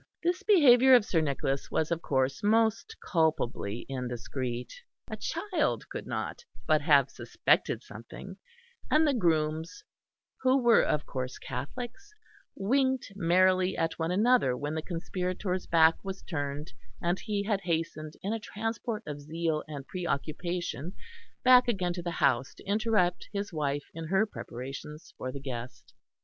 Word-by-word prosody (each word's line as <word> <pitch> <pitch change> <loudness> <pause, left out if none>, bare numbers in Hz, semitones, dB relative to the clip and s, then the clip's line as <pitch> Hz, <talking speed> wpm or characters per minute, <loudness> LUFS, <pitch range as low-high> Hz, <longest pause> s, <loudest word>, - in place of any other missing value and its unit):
This 350 +2 +1
behaviour 265 - +7
of 235 -4 +5
Sir 165 -6 +1
Nicholas' 140 -2 -1
was 160 +1 0
of 170 0 0
course 135 -2 0
most 225 - +2
culpably 135 - 0
indiscreet. 125 -1 -4 0.3
A - - -5
child 410 -3 -1
could - - -6
not - - -4 0.2
but - - +3
have - - +4
suspected - - +1
something, - - -10 0.5
and 310 +1 +4
the 290 - +3
grooms, 160 - 0 0.6
who 260 +1 +4
were 240 -3 +5
of 150 - 0
course 130 -1 -4
Catholics, 245 - -7 0.4
winked 260 +3 +1
merrily 185 +1 +3
at 165 +1 -1
one 160 0 0
another 205 - +3
when 145 +2 -3
the 160 - -2
conspirator's 180 +2 -3
back 165 -1 +4
was 195 -1 -6
turned, 145 -2 -4 0.3
and 175 +2 0
he 205 -2 -2
had 205 -1 0
hastened 165 -3 -2
in 200 +3 -1
a 225 - -2
transport 225 +1 -4
of 145 -1 -6
zeal 160 +1 -2
and 145 -3 -7
preoccupation 170 -1 -3 0.5
back 255 -1 +7
again 185 -7 0
to 175 - -5
the 175 - -3
house 130 -6 +1
to - - -15
interrupt 205 -3 +1
his 200 -2 -4
wife 145 -2 -1
in 165 0 -6
her 190 +5 +3
preparations 135 - -8
for 130 - -5
the 140 - -6
guest. 125 -2 -7
170 Hz, 145 wpm, -29 LUFS, 145-215 Hz, 0.6 s, behaviour